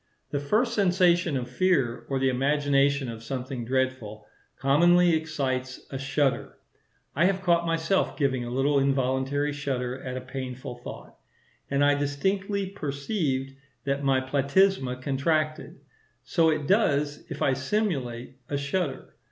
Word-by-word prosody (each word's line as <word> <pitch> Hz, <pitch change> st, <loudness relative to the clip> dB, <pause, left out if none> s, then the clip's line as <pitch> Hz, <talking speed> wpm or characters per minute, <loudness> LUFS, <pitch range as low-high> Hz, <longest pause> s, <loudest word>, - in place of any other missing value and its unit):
The 145 Hz, -, 0 dB
first 215 Hz, -, +1 dB
sensation 180 Hz, -6 st, +3 dB
of 125 Hz, -1 st, -4 dB
fear, 130 Hz, -4 st, 0 dB
or 135 Hz, -, 0 dB
the 135 Hz, 0 st, +2 dB
imagination 140 Hz, +1 st, +2 dB
of 115 Hz, -1 st, -6 dB
something 125 Hz, +1 st, -5 dB
dreadful, 125 Hz, -5 st, -2 dB, 0.3 s
commonly 175 Hz, +5 st, +4 dB
excites 135 Hz, -5 st, -2 dB
a 135 Hz, -, -4 dB
shudder. 135 Hz, 0 st, -1 dB, 0.6 s
I 160 Hz, +5 st, +3 dB
have 190 Hz, 0 st, +1 dB
caught 170 Hz, -1 st, +2 dB
myself 165 Hz, +3 st, 0 dB
giving 130 Hz, -4 st, 0 dB
a 120 Hz, -, -5 dB
little 135 Hz, +3 st, +2 dB
involuntary 135 Hz, +2 st, 0 dB
shudder 130 Hz, -2 st, -3 dB
at 125 Hz, 0 st, -5 dB
a -, -, -4 dB
painful 130 Hz, -1 st, -6 dB
thought, -, -, -9 dB, 0.6 s
and 140 Hz, +1 st, +2 dB
I 145 Hz, -, +5 dB
distinctly 190 Hz, +8 st, -1 dB
perceived 140 Hz, -5 st, -2 dB, 0.3 s
that 140 Hz, 0 st, -1 dB
my 135 Hz, -1 st, +3 dB
platysma 135 Hz, 0 st, +1 dB
contracted; 155 Hz, +3 st, -1 dB, 0.4 s
so 160 Hz, +5 st, +2 dB
it 155 Hz, -2 st, 0 dB
does 145 Hz, -7 st, +1 dB
if -, -, -3 dB
I 135 Hz, -, +3 dB
simulate 130 Hz, -, -2 dB
a 145 Hz, -, -1 dB
shudder. 140 Hz, +1 st, -3 dB
140 Hz, 135 wpm, -26 LUFS, 130-165 Hz, 0.6 s, I